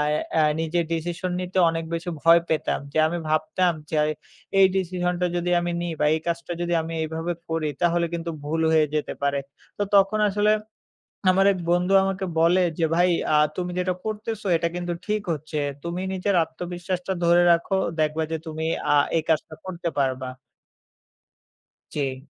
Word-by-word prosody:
এ - - +1 0.2
এ - - +5 0.2
নিজের 165 +1 0
decision 175 +2 -3
নিতে 180 +1 -4
অনেক 165 0 -2
বেশি 170 +2 -3
ভয় 165 +1 +6
পেতাম। 160 -1 0
যে - - -1
আমি 175 +2 -2
ভাবতাম 155 +3 +1 0.2
যে 155 - -1 0.6
এই 195 - +8
decision-টা 180 -1 -1
যদি 175 +1 -1
আমি 175 0 -2
নিই 175 -1 -2
বা 150 - +2
এই 160 - -2
কাজটা 170 +1 -2
যদি 175 0 -1
আমি 165 +1 -6
এইভাবে 160 +2 -3 0.2
করি 160 -2 -1
তাহলে 170 0 +2
কিন্তু 170 0 -3
ভুল 160 +2 -1
হয়ে 155 -1 +5
যেতে 150 - -1
পারে। 140 0 +1 0.4
তো 205 - +1
তখন 200 +2 +4
আসলে 210 +2 +2 0.8
আমার 195 +1 +4
এক 185 - -5
বন্ধু 180 +2 +2
আমাকে 195 0 -2 0.2
বলে 175 +3 +4 0.2
যে, 165 - +2
"ভাই 180 +1 +4 0.3
আ - - +6 0.2
তুমি 180 -1 -2
যেটা 180 0 0
করতেছো 215 0 -4
এটা 170 +1 0
কিন্তু 175 0 -3
ঠিক 210 0 0
হচ্ছে। 155 0 -4 0.3
তুমি 175 +2 -3
নিজের 190 +1 0
আত্মবিশ্বাসটা 175 +3 -4
ধরে 175 +1 +5
রাখো। 170 +3 +1 0.2
দেখবা 155 +1 +1
যে 160 - +1
তুমি 160 0 -4 0.3
আ - - +5 0.2
এই 160 - +2
কাজটা 160 0 0
করতে 175 -2 -4
পারবা।" 130 -1 -1 1.7
জি। 135 -1 -3
170 Hz, 170 wpm, -24 LUFS, 160-180 Hz, 1.7 s, এই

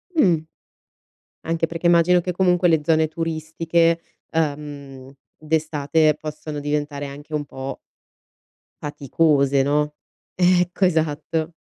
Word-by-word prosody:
Mh. 185 - +4 1.1
Anche 165 0 0
perché 165 +1 -4
immagino 175 +1 +5
che 180 - -2
comunque 180 0 +3
le 160 -2 +4
zone 160 +1 +3
turistiche, 165 +1 0 0.3
uhm, 145 -4 -4 0.2
d'estate 155 -1 +1
possono 155 -1 -6
diventare 145 0 -2
anche 145 +3 -9
un 150 -1 -1
po' 135 -1 -7 1.0
faticose, 140 -1 +2
no, 150 +1 +1 0.4
ecco, 180 +1 +3
esatto. 160 -1 -1
155 Hz, 105 wpm, -22 LUFS, 145-165 Hz, 1.1 s, immagino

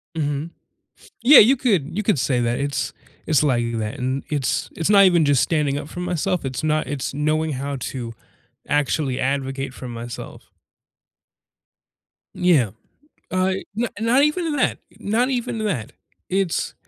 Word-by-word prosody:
Mhm. 145 +1 -2 0.7
Yeah, 270 +4 +9
you 250 +6 +7
could 185 - 0
you 210 - -1
could 200 -8 +2
say 125 -1 +1
that. 120 0 0
It's 140 -1 -2 0.3
it's 155 -3 +3
like 120 -5 +1
that, 110 +5 -3
and 130 +2 -2
it's 145 -4 -1
it's 165 +3 -1
not 200 -1 +7
even 175 -4 +4
just 145 -3 +3
standing 150 -4 0
up 145 - -5
for 175 - -8
myself. 180 -1 -1
It's 130 +1 -4
not 155 0 +1
it's 140 -1 -3
knowing 155 +2 0
how 140 +1 -4
to 120 -3 -6 0.6
actually 145 -2 0
advocate 135 0 -2
for 130 - -8
myself. 120 0 -8 1.8
Yeah. 150 - +3 0.6
Uh, 185 +1 +1 0.2
n 240 +1 +1
not 240 +5 +3
even 305 0 +1
that. 265 - +1 0.2
Not 235 +5 0
even 245 -3 -2
that. 160 - -2 0.4
It's 190 -2 -1
150 Hz, 150 wpm, -22 LUFS, 135-190 Hz, 1.8 s, Yeah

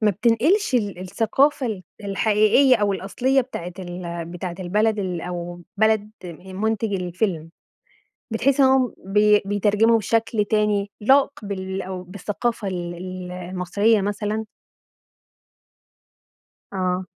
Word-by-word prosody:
ما 215 - +5
بتنقلش 240 - +2
ال 205 -6 0
الثقافة 230 +9 +1
ال 210 -5 -4 0.2
الحقيقية 215 +6 +4
أو 205 -2 +1
الأصلية 250 +8 +1
بتاعة 180 -9 -6
ال 175 -2 -5
بتاعة 175 +1 -6
البلد 210 +4 +1
ال 180 -4 -2
أو 175 0 -6
بلد 220 0 +2
آآ 180 +2 -9
منتج 220 +2 -1
الفيلم. 180 -2 -2 0.8
بتحسهم 270 +4 +3
إنهم 255 -7 0
بي 210 0 +5
بيترجموا 210 +3 +3
بشكل 225 -1 0
تاني 210 -1 +1
لائق 270 +6 +5 0.2
بال 190 -1 -4
أو 185 -1 -6
بالثقافة 200 +4 -3
ال 175 -2 -4 0.4
المصرية 185 +4 +1
مثلًا؟ 210 +2 -2 2.3
آه. 185 -1 -1
205 Hz, 110 wpm, -23 LUFS, 185-220 Hz, 2.3 s, ما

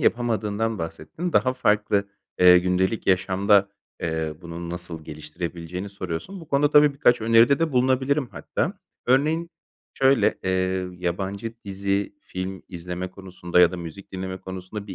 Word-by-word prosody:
yapamadığından 110 -2 0
bahsettin. 85 - -5
Daha 130 - +3
farklı, 105 -4 +1 0.3
ııı, 90 0 +9
gündelik 90 +4 0
yaşamda, 95 +2 +3 0.3
eee, 80 -2 -2
bunu 85 0 -7
nasıl 85 -2 -6
geliştirebileceğini 85 +4 -6
soruyorsun. 100 - -6
Bu 160 - -13
konuda 145 +1 +2
tabii 150 -1 +6
birkaç 120 -3 +3
öneride 115 +4 +5
de 165 -2 0
bulunabilirim 130 +2 +2
hatta. - - -3 0.3
Örneğin 155 +6 +2 0.4
şöyle: 135 0 +3
Eee, 95 0 0
yabancı 95 +5 -3
dizi, 100 +1 -1
film 95 +1 -6
izleme 90 +1 -5
konusunda 90 -2 -1
ya 90 -1 +7
da 90 - -4
müzik 85 +3 -9
dinleme 95 0 -4
konusunda 95 +2 -7
bir 95 - -7
95 Hz, 135 wpm, -24 LUFS, 90-115 Hz, 0.4 s, ııı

